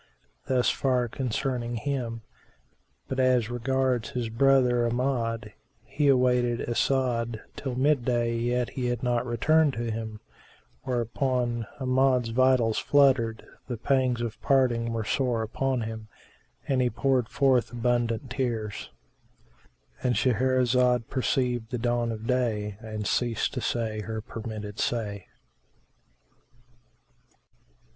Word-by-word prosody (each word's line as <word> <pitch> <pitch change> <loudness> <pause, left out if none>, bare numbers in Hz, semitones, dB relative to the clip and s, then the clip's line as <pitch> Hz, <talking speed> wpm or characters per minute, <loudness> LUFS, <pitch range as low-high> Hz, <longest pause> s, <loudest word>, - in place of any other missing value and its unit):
Thus 125 -2 +2
far 125 -2 +1
concerning 120 0 -2
him; 120 -3 -3 0.8
but 130 - -3
as 125 -3 +2
regards 125 -1 0
his 125 -4 -3
brother 125 0 +3
Amjad, 115 -4 -1 0.3
he 150 -1 0
awaited 125 -2 +3
As'ad 120 -2 0 0.2
till 130 -3 -4
mid 140 0 +2
day 120 -1 0
yet 120 +1 0
he 125 -2 -2
returned 125 +5 +2
not - - -8
to 115 -1 -2
him: 110 -1 -5 0.6
whereupon 120 -1 -1
Amjad's 130 -2 +2
vitals 125 -2 +3
fluttered, 130 -6 +3 0.2
the 125 -2 -4
pangs 130 0 +1
of 115 -2 -5
parting 120 -4 +2
were 115 -1 -2
sore 120 -1 0
upon 130 +3 -1
him 110 -1 -6 0.6
and 130 -2 +2
he 125 - +2
poured 125 0 +1
forth 130 -3 +2
abundant 120 0 -1
tears,—And 120 0 -6
Shahrazad 125 0 +2
perceived 125 -3 0
the 125 - -2
dawn 120 0 0
of 110 0 -6
day 110 -5 0
and 110 -2 -6
ceased 120 +2 0
to 130 - -3
say 110 -3 -2
her 110 +1 -4
permitted 110 -1 -7
say. 105 -5 -2
120 Hz, 115 wpm, -27 LUFS, 115-130 Hz, 0.8 s, brother